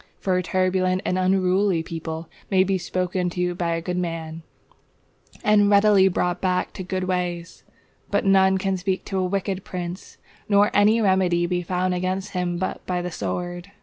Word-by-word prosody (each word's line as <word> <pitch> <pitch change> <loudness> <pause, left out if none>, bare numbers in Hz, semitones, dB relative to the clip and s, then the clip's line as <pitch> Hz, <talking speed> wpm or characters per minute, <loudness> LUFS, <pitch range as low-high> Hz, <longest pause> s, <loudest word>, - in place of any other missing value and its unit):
For 185 -2 0
a 180 - +2
turbulent 185 +1 0
and 180 - 0
unruly 185 -1 +2
people 160 0 -6 0.2
may 190 -2 +4
be 190 0 0
spoken 180 0 -1
to 180 0 -1
by 170 -2 -1
a 165 - -4
good 180 0 -3
man, 165 -2 -4 1.0
and 210 -2 +4
readily 200 -1 +5
brought 180 -1 -1
back 185 -1 0
to 185 - -6
good 185 0 -3
ways; 180 -2 -3 0.5
but - - 0
none 190 0 +4
can 190 0 -1
speak 190 +1 -2
to 195 -2 -2
a - - +1
wicked 190 0 -2
prince, 180 0 -7 0.3
nor 205 0 +4
any 210 +3 +4
remedy 185 -3 +2
be 180 0 -1
found 180 +1 -1
against 185 +2 -2
him 180 -1 -2
but 185 +1 -3
by 180 -1 -1
the 180 - -4
sword. 175 +2 -4
185 Hz, 175 wpm, -23 LUFS, 175-190 Hz, 1.0 s, readily